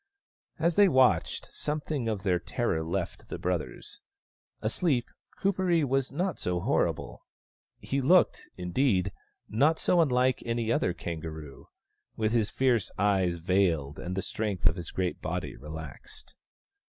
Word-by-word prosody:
As 165 Hz, +1 st, +1 dB
they 205 Hz, -1 st, +8 dB
watched, 130 Hz, -, +2 dB
some 150 Hz, +1 st, -2 dB
thing 145 Hz, -5 st, -3 dB
of 105 Hz, -4 st, -3 dB
their 90 Hz, -3 st, +2 dB
terror 80 Hz, 0 st, -1 dB
left 80 Hz, +2 st, -4 dB
the -, -, -4 dB
brothers. -, -, -4 dB, 0.6 s
Asleep, 125 Hz, +2 st, +1 dB, 0.3 s
Kuperee 185 Hz, -4 st, +2 dB
was 135 Hz, -1 st, 0 dB
not 175 Hz, +4 st, -2 dB
so 90 Hz, -1 st, -1 dB
horrible; -, -, -1 dB, 0.6 s
he 135 Hz, +1 st, -2 dB
looked, 175 Hz, +8 st, +3 dB
indeed, 95 Hz, +1 st, +1 dB, 0.4 s
not 145 Hz, +9 st, +3 dB
so 175 Hz, -, +3 dB
unlike 130 Hz, -3 st, +2 dB
any 115 Hz, -1 st, -1 dB
other 90 Hz, -, +1 dB
kangaroo, 80 Hz, -4 st, -7 dB, 0.5 s
with 110 Hz, -1 st, 0 dB
his 110 Hz, -3 st, +2 dB
fierce 120 Hz, -3 st, +1 dB
eyes 95 Hz, -3 st, +2 dB
veiled 85 Hz, -5 st, +1 dB
and 90 Hz, +3 st, -4 dB
the 95 Hz, -, -2 dB
strength 105 Hz, -5 st, -3 dB
of 85 Hz, -1 st, +5 dB
his 85 Hz, -2 st, -6 dB
great 90 Hz, -1 st, -2 dB
body -, -, -3 dB
relaxed. 75 Hz, +2 st, -9 dB
110 Hz, 140 wpm, -29 LUFS, 90-135 Hz, 0.6 s, they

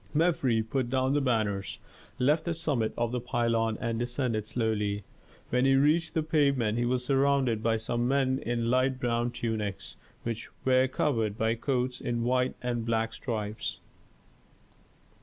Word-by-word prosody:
Mefres 135 Hz, -9 st, +2 dB
put 130 Hz, +1 st, -1 dB
down 130 Hz, +1 st, +1 dB
the 145 Hz, -, +2 dB
banners, 110 Hz, -6 st, 0 dB, 0.4 s
left 150 Hz, +5 st, +2 dB
the 170 Hz, -1 st, -1 dB
summit 135 Hz, -9 st, 0 dB
of 120 Hz, -1 st, 0 dB
the 125 Hz, -, -1 dB
pylon 115 Hz, -2 st, 0 dB
and 115 Hz, -1 st, -2 dB
descended 120 Hz, -3 st, -1 dB
slowly. 105 Hz, -3 st, -1 dB, 0.5 s
When 125 Hz, +1 st, +2 dB
he 135 Hz, 0 st, +5 dB
reached 155 Hz, +4 st, +2 dB
the 160 Hz, -, +2 dB
pavement 140 Hz, -8 st, +2 dB
he 120 Hz, -, +1 dB
was 125 Hz, 0 st, 0 dB
surrounded 135 Hz, -4 st, +2 dB
by 115 Hz, 0 st, +2 dB
some 120 Hz, +2 st, -1 dB
men 135 Hz, 0 st, +2 dB
in 120 Hz, -2 st, -1 dB
light 130 Hz, +1 st, +2 dB
brown 120 Hz, -1 st, 0 dB
tunics, 110 Hz, -4 st, -4 dB, 0.3 s
which 115 Hz, -1 st, -4 dB, 0.2 s
were 130 Hz, 0 st, +4 dB
covered 115 Hz, -6 st, 0 dB
by 110 Hz, 0 st, +2 dB
coats 125 Hz, +1 st, -1 dB
in 120 Hz, -1 st, -1 dB
white 125 Hz, +1 st, +1 dB
and 120 Hz, -2 st, -1 dB
black 115 Hz, 0 st, 0 dB
stripes. 110 Hz, -3 st, -4 dB
120 Hz, 155 wpm, -29 LUFS, 115-130 Hz, 0.5 s, he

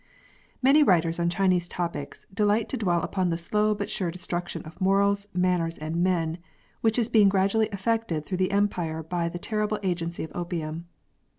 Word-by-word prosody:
Many 275 Hz, +4 st, +6 dB
writers 170 Hz, -, +3 dB
on 170 Hz, 0 st, +2 dB
Chinese 180 Hz, -1 st, +2 dB
topics 170 Hz, -5 st, -5 dB
delight 210 Hz, +2 st, +2 dB
to -, -, -2 dB
dwell 175 Hz, -7 st, +1 dB
upon 185 Hz, -2 st, 0 dB
the 165 Hz, -, 0 dB
slow 210 Hz, +5 st, +1 dB
but 205 Hz, -1 st, -3 dB
sure 180 Hz, -3 st, -2 dB
destruction 175 Hz, 0 st, -4 dB
of 160 Hz, +5 st, -13 dB
morals, 200 Hz, +1 st, +2 dB
manners, 180 Hz, -2 st, 0 dB
and 155 Hz, +2 st, -4 dB
men, 170 Hz, -2 st, +1 dB, 0.4 s
which 225 Hz, 0 st, +2 dB
is 235 Hz, -3 st, +2 dB
being 215 Hz, -4 st, +5 dB
gradually 200 Hz, +3 st, +2 dB
effected 200 Hz, -6 st, -1 dB
throughout 185 Hz, -2 st, -3 dB
the 185 Hz, +1 st, +1 dB
Empire 175 Hz, -6 st, 0 dB
by 170 Hz, +1 st, -2 dB
the 175 Hz, -, -6 dB
terrible 210 Hz, +3 st, -1 dB
agency 170 Hz, -2 st, -2 dB
of 160 Hz, -, -7 dB
opium. 170 Hz, -2 st, -4 dB
180 Hz, 175 wpm, -26 LUFS, 170-205 Hz, 0.4 s, Many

